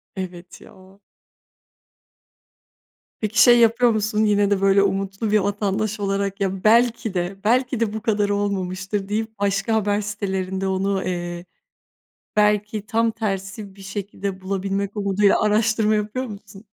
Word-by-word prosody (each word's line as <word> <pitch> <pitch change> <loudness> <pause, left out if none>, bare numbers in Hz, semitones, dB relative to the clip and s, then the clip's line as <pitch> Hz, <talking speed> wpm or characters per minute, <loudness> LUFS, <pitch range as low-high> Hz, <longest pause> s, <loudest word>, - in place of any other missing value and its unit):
Evet 180 -2 -8
ya. 190 +1 -17 2.2
Peki, 220 +2 +1
şey 240 -1 +7
yapıyor 230 +1 +4
musun? 215 0 0
Yine 205 -1 +2
de 195 - +1
böyle, 195 0 +4
umutlu 195 +2 -1
bir 215 - +4
vatandaş 205 +2 -1
olarak 195 0 -2
ya 190 -1 -2
belki 230 -1 +3
de 180 +2 -2
belki 250 +2 +1
de 220 -2 0
bu 220 - -4
kadar 210 -2 +1
olmamıştır 195 0 -2
deyip, 220 0 -3
başka 200 +2 0
haber 205 -1 +1
sitelerinde, 190 -2 -3
onu, 190 0 0
eee, 175 -1 -4 0.9
belki 210 0 +1
tam 225 +2 +1
tersi 195 -2 -4
bir 195 - -13
şekilde 195 -1 -5
bulabilmek 195 +2 -3
umuduyla, 200 0 +2
araştırma 215 0 +2
yapıyor 215 +5 -2
musun? 200 -1 -11
200 Hz, 135 wpm, -22 LUFS, 195-215 Hz, 2.2 s, şey